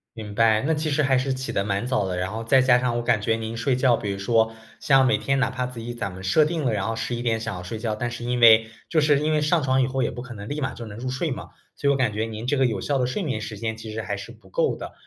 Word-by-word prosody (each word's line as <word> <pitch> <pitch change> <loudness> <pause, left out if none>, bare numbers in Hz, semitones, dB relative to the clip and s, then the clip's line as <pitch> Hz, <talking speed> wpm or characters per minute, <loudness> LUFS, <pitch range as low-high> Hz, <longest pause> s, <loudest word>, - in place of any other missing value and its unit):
明 105 -2 -7
白， 110 0 +4
那 160 - +2
其 155 +1 -1
实 150 +1 +1
还 135 -1 +3
是 135 +1 0
起 130 0 -4
得 100 - 0
蛮 100 +2 -1
早 125 -6 0
的， 90 -1 -3
然 90 +2 -2
后 115 +1 -4
再 130 +4 +4
加 130 -1 +5
上 125 -1 0
我 120 - -2
感 110 -2 +2
觉 115 +2 +1
您 115 0 -5
睡 125 +3 0
觉， 125 -1 +3
比 105 -3 -3
如 100 - -4
说， 110 +2 +2 0.3
像 135 -1 +4
每 130 - +3
天 135 0 0
哪 130 - +1
怕 125 0 -2
自 125 -2 -9
己 120 +1 -5
咱 100 -5 -4
们 95 +1 -10
设 125 +12 +4
定 160 -1 -1
了， 120 - +1
然 100 +1 -1
后 115 - -1
11 120 +1 -3
点 115 -2 0
想 115 -3 -4
要 90 - -6
睡 90 +5 -6
觉， 110 -1 -2
但 120 +3 -2
是 120 0 -7
因 125 0 -1
为 115 -1 +7 0.2
就 160 - +2
是 150 -1 +4
因 155 +1 0
为 155 - +2
上 155 +2 +2
床 130 -1 +2
以 - - +3
后， 130 +1 -2
也 - - +1
不 120 +1 -7
可 125 - -9
能 100 -1 -8
立 145 - -3
马 135 - -2
就 115 -2 -8
能 100 - -9
入 125 +2 -5
睡 130 +6 -1
嘛， 135 - -6 0.3
所 140 - -2
以 - - +5
我 - - 0
感 130 -5 +1
觉 110 +2 -1
您 115 +1 -6
这 145 - +1
个 135 - +3
有 110 -6 -1
效 145 - 0
的 125 - +1
睡 130 +11 -2
眠 135 - -2
时 110 -1 -7
间， 110 0 -3
其 110 -1 -8
实 110 - -3
还 100 -2 -4
是 100 +3 -8
不 110 -5 -18
够 - - +1
的。 - - -8
120 Hz, 360 characters per minute, -24 LUFS, 110-130 Hz, 0.3 s, 为